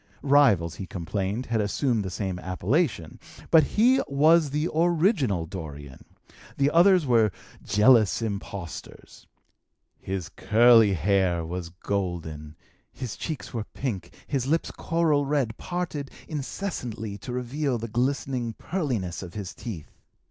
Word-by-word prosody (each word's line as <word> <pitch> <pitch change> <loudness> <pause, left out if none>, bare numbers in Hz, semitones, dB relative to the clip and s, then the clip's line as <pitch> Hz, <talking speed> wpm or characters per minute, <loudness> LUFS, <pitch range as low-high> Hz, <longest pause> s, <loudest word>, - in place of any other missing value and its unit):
Rivals, 125 - +4
he 95 - -6
complained, 100 +7 -3
had 115 -2 0
assumed 110 +2 0
the 95 - -4
same 95 -1 -3
appellation, 95 - -1 0.3
but 160 -1 +7
he 245 - +3
was 155 +3 +4
the 150 +4 -1
original 160 - +2
Dorian; 75 -6 -8 0.5
the 140 +1 +2
others 180 0 +5
were 115 -5 +3 0.3
jealous 110 -1 +4
impostors. 100 -5 -7 0.7
His 95 -3 -4
curly 115 -2 +5
hair 90 -1 +1
was 85 0 -5
golden; 85 -5 -4 0.4
his 125 -5 -6
cheeks 155 -5 -6
were 115 -3 -3
pink; 120 -9 -4
his 135 -3 -2
lips, 165 +3 0
coral 155 -4 +1
red, 135 -6 0
parted 170 -6 -4 0.2
incessantly 130 - -5
to 125 - -7
reveal 125 +2 -2
the 115 0 -5
glistening 125 0 -1
pearliness 125 - -3
of 90 -3 -9
his 100 -4 -5
teeth. 95 -11 -8
115 Hz, 125 wpm, -26 LUFS, 95-145 Hz, 0.7 s, but